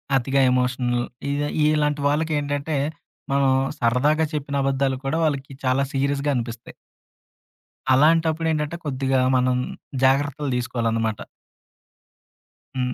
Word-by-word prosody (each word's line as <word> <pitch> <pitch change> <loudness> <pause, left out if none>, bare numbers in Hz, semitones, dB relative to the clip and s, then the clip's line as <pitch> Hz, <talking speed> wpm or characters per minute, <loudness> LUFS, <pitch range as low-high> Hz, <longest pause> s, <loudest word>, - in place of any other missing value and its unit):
అతిగా 135 +1 +2
ఎమోషనల్. 125 -1 0 0.2
ఇ - - 0 0.4
ఇలాంటి 150 -1 0
వాళ్ళకేంటంటే, 145 0 -1 0.6
మనం 140 -1 +3 0.3
సరదాగా 140 +7 +2
చెప్పిన 140 -1 -3
అబద్ధాలు 135 -1 0
కూడా, 145 +4 0
వాళ్ళకి 140 -3 -2
చాలా 130 +2 +2
సీరియస్‌గా 140 +1 0
అనిపిస్తాయి. 115 -1 -5 1.2
అలాంటప్పుడు 160 +3 +3
ఏంటంటే, 150 +1 -2
కొద్దిగా 135 -1 0 0.2
మనం 125 0 +2 0.5
జాగ్రత్తలు 145 +1 +1
తీసుకోవాలన్నమాట. 115 -3 -1 1.6
హ్మ్. 125 -1 -1
135 Hz, 95 wpm, -23 LUFS, 125-150 Hz, 1.6 s, మనం